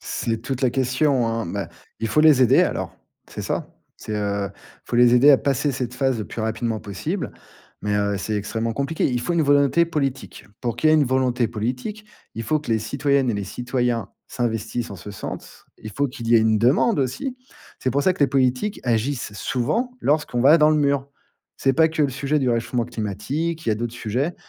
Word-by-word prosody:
C'est 115 -1 -2
toute 130 +1 -4
la 125 - +3
question 130 0 +1
hein. 115 -4 -2
Bah, - - -4 0.3
il 115 - -1
faut 150 - +3
les 150 -4 +6
aider 120 - +5
alors, - - -2 0.3
c'est - - -7
ça. - - -3 0.3
C'est 110 - -6
heu, 100 -1 -1
il - - -25 0.3
faut 120 - -3
les 120 0 +6
aider 135 +4 +7
à 135 - +7
passer 140 +1 0
cette 125 -1 -4
phase 130 -3 0
le 105 - -4
plus 115 - -6
rapidement 110 0 -2
possible, 150 - -4 0.5
mais 105 0 -1
heu, 100 -1 0
c'est 110 +3 -3
extrêmement 115 +3 -2
compliqué. 140 +6 -1
Il 125 -1 -1
faut 175 - -2
une 165 -2 +2
volonté 145 +3 +4
politique. 135 - -3 0.2
Pour 120 -3 -2
qu'il 155 - +3
y - - +5
ait - - +6
une 150 - +4
volonté 125 -2 +1
politique, 125 - -4 0.3
il 115 - -4
faut 155 +7 +1
que 150 - -7
les 110 - +3
citoyennes 140 +2 +1
et - - -1
les 100 -1 -3
citoyens 120 -1 -2 0.2
s'investissent 120 -1 -3
en 100 - -7
ce 100 +4 -9
sens. - - -8
Il 110 - -8
faut 140 +5 0
qu'il 120 -3 -7
y 120 - +5
ait - - +8
une 110 -1 +3
demande 140 - +3
aussi. 140 - -2 0.4
C'est 130 - -1
pour 140 +2 +1
ça 185 - +3
que - - -13
les 140 - +6
politiques 130 +9 0
agissent 120 0 -1
souvent 155 - -1
lorsqu'on 145 -4 +1
va 150 +6 +7
dans 150 0 +5
le 155 - +3
mur. 140 -2 +1 0.5
C'est 135 - +2
pas 160 +4 +4
que 160 -1 -1
le 140 - +3
sujet 140 +3 -1
du 130 - +1
réchauffement 115 0 0
climatique, 140 - -3
il - - -2
y - - +4
a - - +1
d'autres 115 +1 -3
sujets, 125 +10 -2
125 Hz, 220 wpm, -22 LUFS, 115-145 Hz, 0.5 s, ait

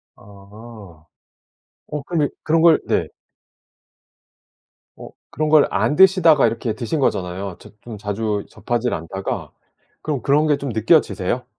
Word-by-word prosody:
아 100 -4 -15 0.8
어 150 -1 -5
근데 150 -1 -1
그런 160 +1 +1
걸 165 -2 +5
네. - - +1 1.9
어 - - -10 0.2
그런 155 +1 -2
걸 155 -2 +5
안 145 - 0
드시다가 175 -5 +5
이렇게 115 -1 -3
드신 135 +5 -3
거잖아요. 95 -5 -2
저 - - -14
좀 115 -3 -9
자주 105 0 -3
접하지를 120 0 -2
않다가 95 +4 -5 0.5
그럼 145 -5 -3
그런 150 +5 +2
게 145 - +2
좀 140 - -5
느껴지세요? 115 - +1
120 Hz, 250 characters per minute, -20 LUFS, 100-150 Hz, 1.9 s, 걸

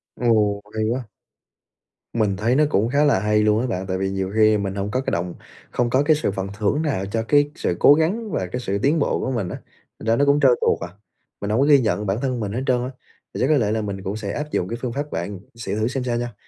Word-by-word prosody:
Ồ, 105 -4 +2
hay 110 - 0
quá! 120 -2 -3 1.0
Mình 105 -4 +1
thấy 115 +5 +1
nó 150 - +4
cũng 110 -5 +1
khá 145 +3 +3
là 140 -9 +3
hay 105 +1 +2
luôn 105 +1 +3
á 130 - -1
bạn. 95 -5 -3
Tại 95 -1 -1
vì 95 +1 -1
nhiều 95 0 -3
khi 110 -1 +5
mình 100 -1 -3
hông 100 +1 -3
có 130 - 0
cái - - -3
động 85 +1 -2 0.4
không 120 -1 0
có 130 +3 +3
cái 155 +1 +4
sự 150 -8 -1
phần 95 0 -4
thưởng 110 +8 +1
nào 140 -12 -1
cho 110 +3 -2
cái 145 +1 +4
sự 90 - -1
cố 145 - +8
gắng 195 +9 0
và 95 - -1
cái 125 - -2
sự 100 -4 -1
tiến 150 +4 +3
bộ 140 - +1
của 130 - -2
mình 110 -8 -2
á, - - -5 0.4
thành - - -8
ra 115 - +4
nó 140 - +3
cũng 140 +1 +4
trơn 135 -3 +6
tuột - - +2
à, - - -20 0.5
mình 100 - -3
hông 110 +3 +1
có 140 - +4
ghi 145 -1 +6
nhận 105 -3 0
bản 95 +1 0
thân 130 -3 -1
mình 105 -3 -3
hết 120 +5 -2
trơn 125 -1 +2
á. 125 - -3 0.4
Thì - - -4
chắc 130 - +3
có 150 0 +4
lẽ 105 -5 +1
là 110 0 0
mình 100 -2 -5
cũng 95 +1 -3
sẽ 105 -2 -4
áp 150 +1 -4
dụng 90 - 0
cái 115 - -4
phương 125 -2 -3
pháp 145 +3 -4
bạn 90 +4 -4 0.2
sẽ 115 -3 -4
thử 110 +1 0
xem 130 +1 -2
sao 120 -1 -1
nha. 120 -1 -4
115 Hz, 290 wpm, -22 LUFS, 100-135 Hz, 1.0 s, cố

